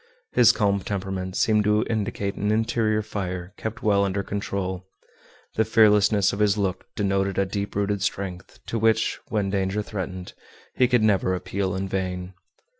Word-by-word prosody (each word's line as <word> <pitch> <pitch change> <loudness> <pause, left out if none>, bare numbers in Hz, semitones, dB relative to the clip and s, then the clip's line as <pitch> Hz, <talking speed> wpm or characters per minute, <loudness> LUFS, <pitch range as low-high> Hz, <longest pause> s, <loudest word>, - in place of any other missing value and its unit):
His 120 - +7
calm 100 -2 +1
temperament 95 -1 -4
seemed 105 -1 +3
to 105 +1 +3
indicate 100 -3 -2
an 105 - -2
interior 110 0 +1
fire, 95 -3 -5
kept 110 0 -6
well 100 -2 +3
under 100 0 -1
control. 95 -2 -3 0.7
The 110 - +2
fearlessness 105 -2 +4
of 100 - -4
his 105 -1 +3
look 95 -2 -2
denoted 95 -1 0
a 100 - +3
deep 100 +1 -4
rooted 100 0 0
strength, 95 -3 -4
to 115 - -2
which, 110 0 +2
when 100 -3 -1
danger 100 +1 0
threatened, 95 -3 -6 0.4
he 125 - +3
could 120 -3 +3
never 95 -3 +2
appeal 95 +1 -2
in 95 +1 -2
vain. 90 -1 -3
100 Hz, 160 wpm, -24 LUFS, 95-105 Hz, 0.7 s, His